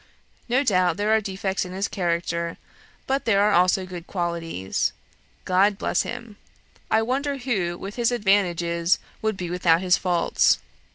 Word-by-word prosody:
No 260 +4 +3
doubt, 185 - +2
there 205 +1 0
are 220 0 +4
defects 195 -1 -2
in 180 -1 -8
his 195 +2 -1
character, 170 -2 -2 0.5
but 270 +1 -1
there 200 -3 +3
are 210 - +3
also 185 0 +3
good 180 -2 -9
qualities... 170 - -2 0.5
God 195 +2 +3
bless - - 0
him! 220 -3 -7 0.5
I 220 - +3
wonder 275 +4 -1
who, 200 -10 -2
with 195 +5 -8
his 240 0 +2
advantages, 175 -6 +2 0.2
would 220 -3 -1
be 175 -2 -4
without 175 -2 +3
his 185 -1 +3
faults. 175 -2 +2
190 Hz, 155 wpm, -24 LUFS, 175-215 Hz, 0.5 s, are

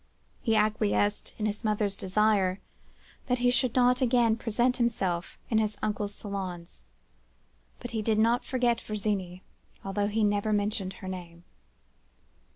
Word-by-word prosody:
He 225 -2 +1
acquiesced 210 -1 +1
in 215 - -2
his 210 +2 -2
mother's 210 -2 0
desire, 195 -1 +2 0.7
that 250 -1 +2
he 245 0 +3
should 250 -1 +1
not 250 0 +4
again 240 -3 +3
present 240 +2 0
himself 190 -8 -1
in 220 - +4
his 215 -1 -1
uncle's 210 -1 -2
salons; 185 -4 -6 1.0
but 245 - -7
he 225 -2 -1
did 215 0 +1
not 230 +3 +3
forget 245 -3 +1
Virginie, 195 -4 -3 0.4
though 200 +1 0
he 215 +1 0
never 205 +1 +1
mentioned 205 -2 -1
her 185 - -10
name. 175 -2 -7
210 Hz, 140 wpm, -28 LUFS, 195-230 Hz, 1.0 s, not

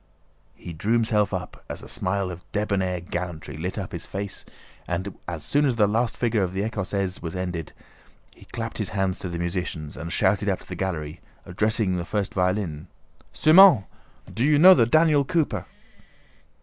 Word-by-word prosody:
He 85 - -9
drew 100 +8 -1
himself 110 -3 +2
up, - - -6
a - - -4
smile 95 0 -1
of 90 0 -9
debonair 95 -4 -1
gallantry 85 -4 -5
lit 90 +6 -4
up 95 -4 -4
his 85 - -7
face 100 0 -5 0.4
and 95 +2 -3
as 85 -3 -5
soon 145 +1 +2
as 130 -4 +2
the 110 -2 +4
last 115 +3 0
figure 115 -3 +1
of 90 -1 -1
the 100 +3 -1
écossaise 100 -3 -3
was 85 +2 -5
ended, 90 -3 -4 0.6
he - - -17
clapped 115 -1 -6
his 105 - -2
hands 95 -1 0
to 90 - -5
the 85 - -4
musicians 85 -3 -4
and 85 +5 -6
shouted 100 +3 +2
up 95 - -1
to - - -17
their 90 - -6
gallery, 80 -5 -4 0.2
addressing 105 0 0
the 85 - -2
first 100 0 -2
violin: 90 -4 -1 0.4
"Semën! 165 - +7 0.5
Do 115 - -1
you 150 +1 +4
know 185 +5 +9
the 115 -9 +3
Daniel 155 +1 +4
Cooper?" 160 +1 -1
95 Hz, 175 wpm, -24 LUFS, 90-110 Hz, 0.6 s, know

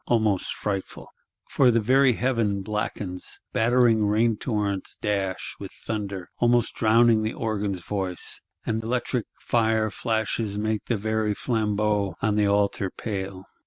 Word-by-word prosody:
Almost 110 -5 +1
frightful! 100 -2 -4 0.4
For 130 - +4
the 115 -1 +4
very 130 +4 +4
heaven 110 -5 0
blackens; 100 -3 -3
battering 115 -1 +4
rain 110 +2 +3
torrents 105 -4 -2
dash, 100 -3 -2
with - - -7
thunder; 100 -4 -5
almost 120 -1 +3
drowning 115 0 +4
the 110 +1 -2
organ's 105 -4 -2
voice: 95 -1 -4 0.2
and 110 0 -1
electric 120 0 -1
fire 110 -2 +1
flashes 110 -2 -1
make 110 0 -1
the 115 - 0
very 110 0 0
flambeaux 105 -5 0
on 110 - +1
the 105 -1 +3
altar 100 -1 +1
pale. 95 -2 -5
110 Hz, 130 wpm, -25 LUFS, 100-115 Hz, 0.4 s, For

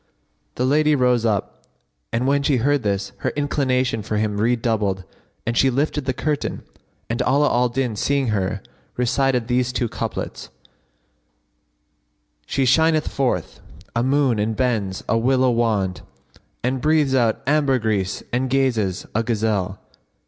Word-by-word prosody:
The 125 - 0
lady 150 +3 +3
rose 125 -3 +2
up 105 -4 -2 0.5
when 135 +5 +1
she 140 -1 +2
heard 140 +4 +2
this, 100 -2 -1
her - - -1
inclination 130 -5 0
for 105 +1 -3
him 105 -1 -1
redoubled 110 -5 0 0.4
and 115 - -1
she 135 - +4
lifted 145 +2 -1
the 130 - +1
curtain; 150 +2 -2 0.4
and 115 - -2
Ala 145 +3 +3
al 125 0 +2
Din, 120 -2 -1
seeing 140 +2 0
her, 100 -1 -1 0.3
recited 125 -1 +1
these 125 0 +1
two 125 -1 -1
couplets, - - -5 2.0
"She 135 -1 0
shineth 155 +4 +3
forth, 125 - -1 0.4
a 115 - +2
moon, 130 -3 +2
and 110 +1 0
bends, 105 -7 -1
a 115 - +2
willow 130 +1 +3
wand, 110 -6 0 0.3
* - - -31
And 130 +1 -1
breathes 150 -2 +2
out 120 -4 +2
ambergris, 125 -9 +1
and 130 +2 0
gazes, 115 -8 0
a 110 - +2
gazelle. 105 -4 -1
125 Hz, 140 wpm, -22 LUFS, 110-135 Hz, 2.0 s, she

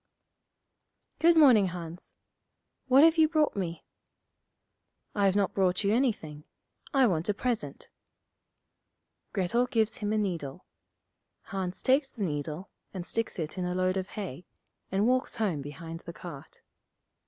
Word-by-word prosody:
'Good 335 0 +5
morning, 245 -10 +7
Hans. 175 -1 -8 0.7
What 265 +2 +7
have 325 0 +5
you 315 -1 +6
brought 310 -2 +2
me?' 175 -4 -4 1.3
'I've 200 -2 +2
not 200 -2 +1
brought 185 0 +1
you 200 +1 +2
anything. 200 - -1 0.5
I 270 -3 +4
want 175 -4 0
a 205 - +1
present.' 240 +1 -3 1.4
Grettel 225 +6 +1
gives 225 -4 +1
him 210 -1 -2
a 215 - +1
needle. 175 -6 -3 0.8
Hans 190 -2 -5
takes 270 +1 +3
the 220 - -5
needle, 155 +2 -4 0.2
and 180 -2 -4
sticks 230 +2 -2
it 160 +2 -4
in 180 - -1
a 180 0 -2
load 185 0 +1
of 190 -1 -2
hay, 180 -5 -6 0.4
and 195 +2 +2
walks 255 +1 +1
home 200 -10 -1
behind 160 +4 -8
the 170 - -9
cart. 165 -6 -10
195 Hz, 140 wpm, -29 LUFS, 175-235 Hz, 1.4 s, morning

